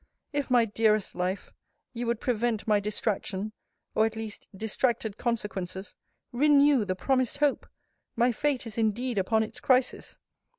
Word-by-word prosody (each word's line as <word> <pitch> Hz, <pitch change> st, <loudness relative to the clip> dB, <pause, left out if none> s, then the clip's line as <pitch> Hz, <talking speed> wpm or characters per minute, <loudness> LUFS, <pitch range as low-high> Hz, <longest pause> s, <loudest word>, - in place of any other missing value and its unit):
If, 285 Hz, -1 st, -1 dB
my 245 Hz, -2 st, +5 dB
dearest 215 Hz, -1 st, +1 dB
life! 185 Hz, +2 st, -3 dB, 0.4 s
you 240 Hz, 0 st, -3 dB
would 235 Hz, -1 st, 0 dB
prevent 235 Hz, -3 st, -1 dB
my 210 Hz, -1 st, +4 dB
distraction, 205 Hz, -1 st, -2 dB, 0.4 s
or, 220 Hz, +1 st, +4 dB
at 225 Hz, -, -7 dB
least, 220 Hz, -2 st, -6 dB
distracted 220 Hz, 0 st, 0 dB
consequences, 205 Hz, -5 st, -3 dB, 0.4 s
renew 280 Hz, -2 st, +5 dB
the 185 Hz, -2 st, -1 dB
promised 255 Hz, +5 st, +1 dB
hope! 290 Hz, -2 st, +1 dB, 0.5 s
My 245 Hz, +1 st, +3 dB
fate 270 Hz, +1 st, -1 dB
is 225 Hz, 0 st, -5 dB
indeed 225 Hz, +1 st, 0 dB
upon 220 Hz, +4 st, +2 dB
its 220 Hz, -, -7 dB
crisis. 255 Hz, -1 st, +1 dB
225 Hz, 140 wpm, -28 LUFS, 210-250 Hz, 0.5 s, my